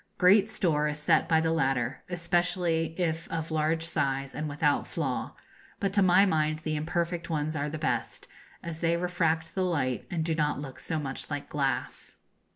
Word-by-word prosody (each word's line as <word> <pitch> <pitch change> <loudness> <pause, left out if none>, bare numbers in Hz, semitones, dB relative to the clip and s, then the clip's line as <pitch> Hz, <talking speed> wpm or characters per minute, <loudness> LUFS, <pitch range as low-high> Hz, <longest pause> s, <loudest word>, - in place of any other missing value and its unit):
Great 195 +3 +5
store 155 -8 +1
is 150 0 -2
set 160 +2 +2
by 160 -1 +5
the 160 0 +1
latter, 135 -5 0
especially 175 -1 0
if 165 -2 -1
of 160 0 -3
large 160 +1 +1
size 135 -4 -1
and 150 +2 -3
without 145 0 +1
flaw; 135 -6 -3 0.4
but 195 -1 -1
to 200 - +4
my 185 +1 +6
mind 155 -4 +1
the 155 0 -3
imperfect 170 +2 -2
ones 155 -1 -1
are 145 0 -1
the 155 - -4
best, 155 - -2 0.4
as 170 -1 -4
they 170 0 +2
refract 165 -2 0
the 190 - -1
light 145 -9 -1
and 165 -2 -1
do 165 - +1
not 150 -3 0
look 135 -2 -8
so 160 - -2
much 135 -3 -4
like 145 -1 -4
glass. 135 -3 -2
160 Hz, 180 wpm, -28 LUFS, 150-170 Hz, 0.4 s, my